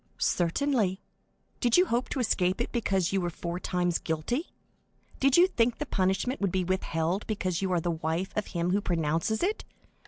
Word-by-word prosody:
"Certainly. 195 +1 +1 0.6
Did 240 +3 +3
you 360 - +6
hope 245 -6 -1
to 275 - -2
escape 190 -5 +1
it 240 - -2
because 195 -7 0
you 195 - +2
were 175 - -1
four 170 +1 -5
times 180 -2 0
guilty? 165 - -2 0.7
Did 270 +2 +4
you 350 - +8
think 240 -10 +1
the 300 - -3
punishment 195 +4 0
would 200 -2 +1
be 185 0 0
withheld 180 0 -1
because 185 -5 -1
you 190 -1 -1
are 180 - +2
the 170 +1 -1
wife 165 +3 -2
of 210 - -1
him 170 0 -1
who 200 +2 +2
pronounces 165 - 0
it? 415 +4 0
190 Hz, 185 wpm, -28 LUFS, 175-235 Hz, 0.7 s, you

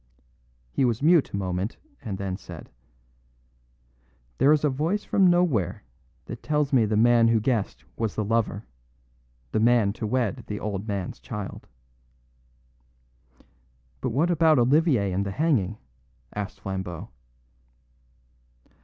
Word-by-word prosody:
He 135 - 0
was 120 +1 0
mute 165 -1 +5
a - - -3
moment, 95 +2 -3 0.2
and 100 -5 -5
then 95 -1 -3
said: 95 - -11 1.7
"There 140 - +5
is 155 -1 +3
a 150 - +3
voice 160 +10 -1
from 195 -2 +3
nowhere 115 - +1 0.4
that - - -8
tells 150 -2 0
me 120 -4 +5
the 105 0 0
man 120 +1 +5
who 115 -1 +3
guessed 115 -2 -1
was 110 -3 -2
the 110 - -1
lover... 110 -1 0 0.9
the - - +1
man 115 -3 +3
to 110 -1 -4
wed 120 +1 -1
the 105 - -4
old 100 0 -4
man's 100 -3 -4
child." 105 -6 -7 2.3
"But - - -2
what 150 +9 +1
about 160 -2 +4
Olivier 130 - +3
and 95 +2 0
the 100 - -3
hanging?" 105 - 0 0.6
asked 100 -1 -5
Flambeau. 95 0 -5
115 Hz, 130 wpm, -25 LUFS, 100-140 Hz, 2.3 s, mute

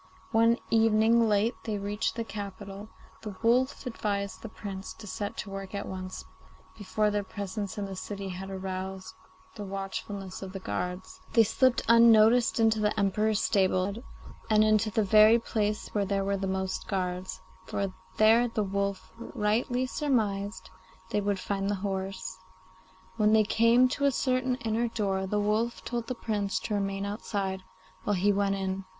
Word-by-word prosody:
One 230 +1 +4
evening 225 +1 +4
late 210 +3 +2
they 215 -2 -2
reached 205 +2 -2
the 230 - -2
capital, 200 -2 -7
and 210 - -9 0.3
the 210 -3 -7
wolf 250 +4 +2
advised 200 -4 -3
the 225 - -7
Prince 195 -3 -7
to 220 - -12
set 205 +1 -5
to 195 - -5
work 195 0 -6
at 200 - -4
once, 185 0 -6 0.5
before 210 0 0
their 205 0 0
presence 200 0 -5
in 205 - -2
the 195 -1 -6
city 200 +1 -5
had 190 +1 -6
aroused 190 0 -5 0.4
the 210 - -7
watchfulness 195 0 -5
of 190 -1 -7
the 195 - -5
guards. 180 0 -4
They 230 - +7
slipped 255 +3 +2
unnoticed 230 +1 +6
into 220 -1 +3
the 210 0 +1
Emperor's 210 +2 +1
stables 190 +1 +1 0.5
and 215 -1 +5
into 215 0 +3
the 215 +1 +1
very 215 +3 +7
place 215 -2 -2
where 205 -2 0
there 195 0 0
were 200 0 0
the 195 0 -3
most 190 0 -2
guards, 185 -1 -3 0.3
for 195 -1 -2 0.2
there 225 +3 +5
the 225 -2 -1
wolf 200 0 -2
rightly 235 +3 0
surmised 215 -8 -1 0.4
they 210 - +1
would 200 -1 -1
find 195 +1 -2
the 205 - +1
horse. 190 -1 -4 0.8
When 215 -1 +4
they 220 -1 +6
came 230 +4 +4
to 280 +1 -1
a 280 - +4
certain 255 0 0
inner 225 +2 +1
door 195 -4 -1
the 210 +2 0
wolf 215 +3 0
told 235 -1 -3
the 255 - -3
Prince 205 -4 -2
to 215 - -3
remain 195 -1 -1
outside, 200 -2 -3 0.4
while 205 - +1
he 200 +3 +3
went 200 0 +1
in. 190 0 -3
205 Hz, 170 wpm, -28 LUFS, 195-225 Hz, 0.8 s, They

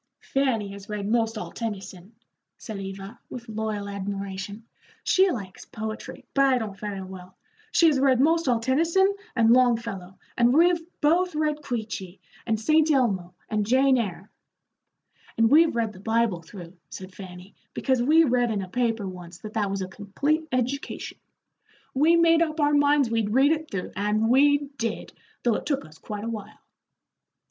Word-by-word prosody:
"Fanny 255 -7 +1
has 200 0 -10
read 210 -1 -3
'most 225 0 +1
all - - -6
Tennyson," 195 -2 -7 0.4
said 215 -3 -7
Eva, 195 +3 -8
with 240 -1 -8
loyal 215 -2 -3
admiration; 200 +1 -5 0.4
"she 380 +1 +4
likes 200 - -6
poetry, 220 0 -7
but 275 0 +4
I 260 -1 +3
don't 215 -4 -4
very 200 -1 -5
well. 185 -1 -11 0.3
She 340 - +4
has 300 -4 +4
read 265 -2 +3
most 325 +3 +3
all 240 -2 +3
Tennyson 330 +11 +2 0.2
and 230 -2 +4
Longfellow, 230 -7 +1 0.2
and 240 +1 +3
we've 340 +1 +4 0.2
both 345 +3 +2
read 300 -1 0
Queechee, 215 -8 -5 0.3
and 220 -2 +1
St. 310 +7 +3
Elmo, 195 - +1
and 215 -1 0
Jane 260 +5 +4
Eyre." 195 -2 -5 1.1
"And 225 0 +3
we've 320 0 +5
read 225 -2 -1
the 185 - -13
Bible 225 -3 0
through," 175 0 -11 0.2
said 185 0 -9
Fanny, 185 0 -11 0.2
"because 260 -2 +1
we 310 +6 +5
read 245 -4 +2
in 205 -3 -1
a - - -7
paper 225 -2 -1
once 180 -2 -9
that 215 +3 -9
that 210 -3 0
was 195 -1 -2
a - - -5
complete 280 - -2
education. 255 +3 -3 0.7
We 310 +5 +4
made 335 -1 +4
up 315 -1 0
our 295 0 +3
minds 285 -3 +3
we'd 225 -1 0
read 275 +3 +5
it 315 -1 -1
through, 195 -2 -4
and 210 +3 +1
we 285 +2 +4
did, 230 -1 -3 0.3
though 240 - +3
it - - -3
took 280 -2 -1
us 155 +1 -16
quite 210 -1 -6
a - - -4
while." 220 -3 -7
225 Hz, 170 wpm, -25 LUFS, 200-280 Hz, 1.1 s, we've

